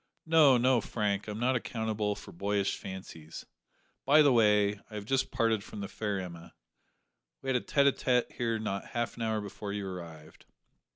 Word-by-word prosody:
No, 155 -5 +6
no, 125 0 +3
Frank, 105 -2 -2
I'm 105 0 -5
not 130 +2 +2
accountable 110 -4 -2
for - - -11
boyish 100 +2 -1
fancies. 85 -4 -9 0.6
By 150 +3 +6
the 140 -3 +5
way, 105 -3 +3
I 110 - -10
have 105 -1 -5
just 135 +3 0
parted 115 -3 +1
from 105 - -8
the 100 - -4
fair 105 -2 -3
Emma. 85 -2 -9 0.9
We 135 - -3
had 130 - +2
a 125 - +2
tete 140 -1 +2
a 140 - +6
tete 125 -2 0
here 115 -2 -1
not 100 -3 -3
half 120 - -1
an - - -8
hour 110 -1 0
before 100 0 -6
you 100 -1 -3
arrived." 85 -4 -9
105 Hz, 185 wpm, -30 LUFS, 100-125 Hz, 0.9 s, No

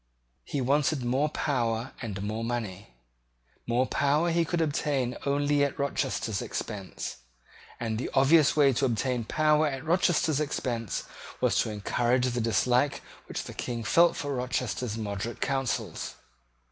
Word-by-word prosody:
He 140 - -2
wanted 140 +1 +1
more 135 +5 +1
power 120 -5 -1
and 100 -4 -4
more 110 +2 -3
money. 110 -5 -3 0.8
More 120 +2 +2
power 150 +6 +2
he 170 0 +3
could 170 +1 -1
obtain 145 -5 0
only 145 +1 +2
at 140 - -1
Rochester's 135 -7 -1
expense; 100 -4 -5 0.6
and 110 -2 -2
the - - -3
obvious 145 +3 +5
way 140 -3 +5
to 135 - +1
obtain 120 0 0
power 155 +3 +3
at 135 0 -4
Rochester's 165 -3 +2
expense 120 - -2 0.4
was - - +2
to - - +1
encourage 120 +4 +1
the 120 -1 -1
dislike 125 +4 +2 0.2
which - - -4
the - - -8
King 120 -2 -4
felt 170 +9 +4
for 145 -1 -3
Rochester's 125 -3 -2
moderate 105 +1 -4
counsels. 135 -3 -2
130 Hz, 140 wpm, -28 LUFS, 115-145 Hz, 0.8 s, obvious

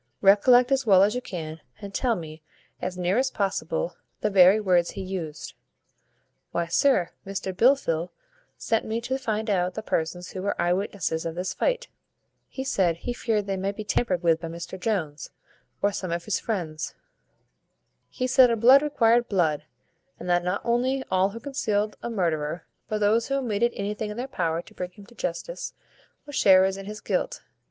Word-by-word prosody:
Recollect 245 +6 +6
as 270 0 +3
well 195 -5 +6
as 205 +2 +3
you 250 - -2
can, 160 -7 -6 0.2
and 200 -1 -8
tell 245 -3 +1
me, 160 -3 -8 0.4
as 180 0 -3
near 180 +5 +1
as 265 0 +1
possible, 260 - -2 0.2
the 210 - 0
very 190 +2 +7
words 180 -4 +2
he 195 - -5
used." 175 -5 -5 1.0
"Why, 170 - 0
sir, 180 0 +2
Mr 190 -1 -4
Blifil 180 - +2 0.5
sent 225 -1 0
me 220 +1 -2
to 260 +3 -2
find 220 -3 -2
out 185 -3 0
the 220 - -4
persons 175 0 -2
who 185 - -5
were 200 +1 -2
eye 175 0 +2
witnesses 180 -4 -2
of 165 -1 -4
this 180 +1 -3
fight. - - 0 0.6
He 265 - -5
said, 185 -10 +1
he 245 +8 -4
feared 220 -4 -1
they 195 -1 -2
might 195 +1 -2
be 215 - -5
tampered 190 -4 0
with 165 -1 +3
by 165 - -4
Mr 170 +3 -7
Jones, 180 -8 -2 0.5
or 205 - +4
some 185 -3 -4
of 170 0 -3
his 215 - 0
friends. 165 -8 -4 1.1
He 255 - -3
said, 250 -3 +5
blood 255 +5 +8
required 240 -5 +3
blood; 165 -7 +1 0.5
and - - -7
that 175 0 +2
not 180 +3 -1
only 255 +3 +1
all 190 +1 +3
who 225 +3 -8
concealed 215 -6 -1
a - - -4
murderer, 170 -6 -1 0.2
but 215 0 -1
those 220 +3 +3
who 275 - 0
omitted 235 -3 +1
anything 210 +1 -3
in 210 - -6
their 250 +2 -3
power 170 -8 -1
to - - -17
bring 180 -1 -5
him 200 +3 -15
to 240 - -18
justice, 235 - -5 0.5
were 290 - -10
sharers 190 -5 +5
in 195 0 -8
his 210 0 -7
guilt. - - -2
200 Hz, 185 wpm, -26 LUFS, 180-235 Hz, 1.1 s, blood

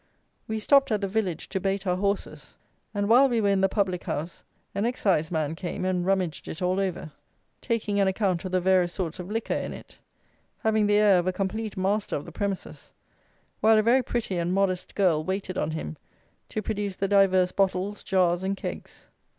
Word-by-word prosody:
We 220 - -2
stopped 275 +4 +4
at 215 - +2
the 200 - -2
village 190 -5 -2
to 190 - -2
bait 195 +1 -1
our 180 -1 +1
horses; 200 +1 -3 0.4
and 205 -1 -1
while 255 +5 +6
we 235 -2 +1
were 205 -2 +2
in 195 -1 +2
the 195 - +3
public 185 -3 -1
house 160 +4 -4 0.3
an 200 - -1
Exciseman 160 - 0
came 175 +2 -4
and 185 -1 0
rummaged 185 -3 -1
it 155 - -6
all 185 +1 0
over, 185 -5 -3 0.5
taking 215 -4 -1
an 195 - +3
account 190 -3 0
of 185 - -5
the 185 - +2
various 180 -1 +3
sorts 180 -2 -4
of 180 +1 -6
liquor 225 +1 -2
in - - -3
it, - - -13 0.6
having 220 -1 +2
the 205 0 +4
air 205 -3 +5
of 175 - -2
a - - +3
complete 205 +3 -3
master 200 +3 0
of 145 - -4
the 170 - -9
premises, 200 +2 -5 0.7
while 220 0 +5
a 215 - +4
very 245 +4 +4
pretty 220 -7 -2
and 175 +2 0
modest 190 -2 0
girl 175 -6 +2
waited 190 +1 -3
on 150 - -1
him 120 - -5 0.5
to 215 - -3
produce 205 -2 -3
the 195 - -1
divers 190 -2 +4
bottles, 195 +1 0
jars, 180 -2 +2
and 195 +1 -2
kegs. - - -7
195 Hz, 200 wpm, -26 LUFS, 180-210 Hz, 0.7 s, while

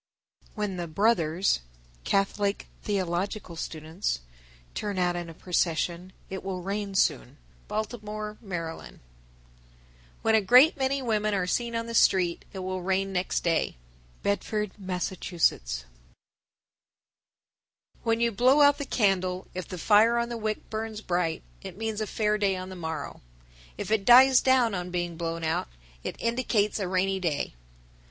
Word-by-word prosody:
_ - - -28
1004. - - -3
When 195 -3 -2
the 170 -2 -5
Brothers 180 - +2 0.5
(Catholic 200 +1 0 0.2
theological 190 -1 -2
students) 160 - -3 0.5
turn 205 -2 -3
out 180 -1 +1
in 175 -1 -4
a 165 - -10
procession 175 +1 -1 0.2
it 190 0 -6
will 185 -2 -4
rain 200 +1 -3
soon. 145 -6 +1 0.3
Baltimore, 215 0 -4
Md. 175 -5 -3
1005. 160 - -9 1.2
When 225 - +3
a 220 - +5
great 250 - +7
many 270 0 0
women 215 -3 +1
are 185 -2 0
seen 235 +5 -1
on 230 0 -1
the 230 - -6
street, 180 -5 +3
it 195 - -9
will 185 0 -3
rain 190 +1 0
next 180 0 -1
day. 165 - 0 0.5
Bedford, 210 0 -1
Mass. 185 -2 -2
1006. 65 - 0 2.2
When 225 0 +1
you 235 0 +2
blow 255 +7 +4
out 285 0 +6
the 285 - -3
candle, 185 -6 +1
if 185 0 -5
the 185 - -6
fire 220 +6 +5
on 235 0 0
the 240 - -4
wick 215 -1 -3
burns 220 0 -4
bright, 175 -4 -1 0.2
it 190 -2 -9
means 220 -1 -3
a 215 - -2
fair 210 +1 0
day 195 -2 +2
on 185 0 -6
the 185 - -8
morrow; 160 -4 -5 0.6
if - - -5
it 220 -3 +2
dies 255 +1 +8
down 255 -4 +3
on 180 -1 -3
being 175 -1 -2
blown 165 0 -3
out, 160 0 0 0.4
it - - -4
indicates 230 -3 +1
a 195 - -1
rainy 190 +1 +1
day. 165 - -1
195 Hz, 155 wpm, -27 LUFS, 175-220 Hz, 2.2 s, dies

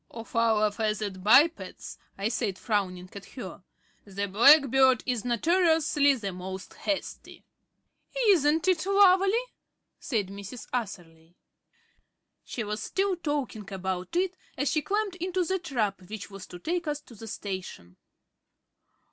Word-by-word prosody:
"Of 230 0 -10
our 220 -2 +3
feathered 210 -3 -3
bipeds," 295 - +3 0.2
I 200 +2 -1
said, 220 -5 -2
frowning 185 -5 -2
at 200 - -9
her, 200 -7 -9 0.4
"the 200 0 -4
blackbird 265 +3 +6
is 245 -4 -1
notoriously 300 - +3
the 200 -6 -5
most 185 +1 -7
hasty." 300 -2 -5 0.8
"Isn't 320 -2 +3
it 360 -4 +2
lovely?" 390 -1 +5 0.7
said 230 - -2
Mrs. 200 +4 -9
Atherley. 175 -8 -6 1.1
She 235 - -5
was 210 +1 -4
still 385 - 0
talking 285 - -4
about 190 - -4
it 365 +1 +1 0.2
as 280 +1 0
she 310 - +1
climbed 405 +1 -2
into 365 0 -1
the 380 +2 -1
trap 225 - -2
which 215 -1 -7
was 195 -1 -9
to 180 - -9
take 340 - -3
us 295 -1 -1
to 250 - -16
the 225 +1 -10
station. 185 - -7
230 Hz, 130 wpm, -28 LUFS, 200-320 Hz, 1.1 s, blackbird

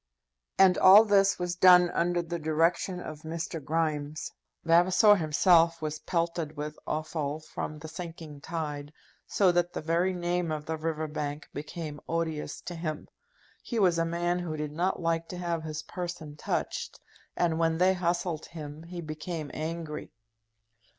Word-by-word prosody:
And 190 -2 +6
all 200 +4 +9
this 195 -2 +4
was 180 0 -2
done 180 -1 +7
under 175 0 +1
the 170 0 -4
direction 165 +4 +1
of 155 -3 -8
Mr. 165 -1 -5
Grimes. 155 -1 -2 0.3
Vavasor 180 +5 +6
himself 165 +1 +4
was 155 -1 -4
pelted 170 -3 -2
with 150 +1 -5
offal 155 -1 -2
from 155 0 -6
the 155 +1 -9
sinking 160 -3 -8
tide, 150 -3 -4 0.4
so 190 -3 +3
that 175 0 +1
the - - -3
very 170 +4 +1
name 175 -1 -1
of 150 -1 -3
the 160 - -2
River 160 0 -2
Bank 150 0 -4
became 150 +1 -6
odious 160 -3 -2
to 175 - -6
him. 155 -2 -5 0.5
He 235 - -4
was 180 -5 +3
a - - +3
man 175 +1 0
who 165 -3 -4
did 150 -1 -3
not 175 +5 -1
like 165 -1 0
to 180 - -7
have 170 -2 -2
his 155 -1 -5
person 175 -4 -6
touched, - - -3 0.4
and 165 -2 +1
when 165 -1 +2
they 185 +2 +4
hustled 175 -2 -1
him 150 -2 -8
he 170 +1 -7
became 155 -1 -5
angry. 160 -1 -5
165 Hz, 155 wpm, -29 LUFS, 155-175 Hz, 0.5 s, all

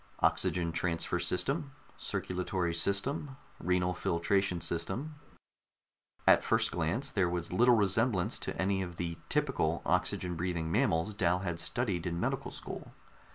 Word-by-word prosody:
Oxygen 85 -2 +2
transfer 85 0 -1
system, 135 - -1 0.2
circulatory 90 -1 -2
system, 115 - 0 0.2
renal 90 +1 +1
filtration 90 +2 +1
system 95 - -1 1.1
at - - +6
first - - +2
glance, 90 - -1
there 95 -5 +2
was 85 0 -3
little 120 +5 +6
resemblance 105 -1 +2
to - - -5
any 95 0 +1
of 90 -2 -5
the 85 -1 -4
"typical" 135 - +1
oxygen 90 -1 +1
breathing 85 -1 -2
mammals 85 +5 +2
Dal 90 -3 +1
had 85 -3 -3
studied 95 -8 -1
in 85 0 -2
medical - - -1
school. - - -8
90 Hz, 130 wpm, -32 LUFS, 85-105 Hz, 1.1 s, at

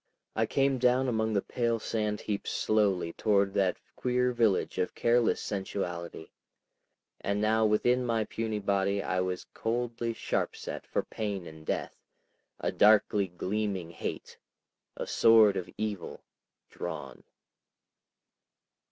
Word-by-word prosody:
I - - +1
came 135 -1 +2
down 125 +1 +3
among 110 -2 0
the 100 - +1
pale 115 -1 0
sand 105 -1 -2
heaps 100 -2 -3
slowly 100 -6 +1
toward 100 -2 +2
that 95 -2 +1 0.2
queer 125 0 +1
village 115 -6 +1
of 90 - -1
careless 120 0 +3
sensuality, 90 -5 -4 0.9
and 100 +1 -1
now 110 +1 +3
within 120 +4 +2
my 115 -2 +1
puny 110 0 -3
body 100 -1 0
I 90 +1 -1
was 90 0 -2
coldly 115 0 -2
sharpset - - -3
for - - -1
pain 100 -4 -4
and 80 -1 -12
death, - - -2 0.6
a - - -1
darkly 105 -1 +4
gleaming 95 -1 -3
hate, 85 - -6 0.6
a - - -3
sword 110 -3 +6
of 90 - -4
evil, 105 -4 -4 0.5
drawn. 65 -3 -6
105 Hz, 125 wpm, -30 LUFS, 95-115 Hz, 0.9 s, sword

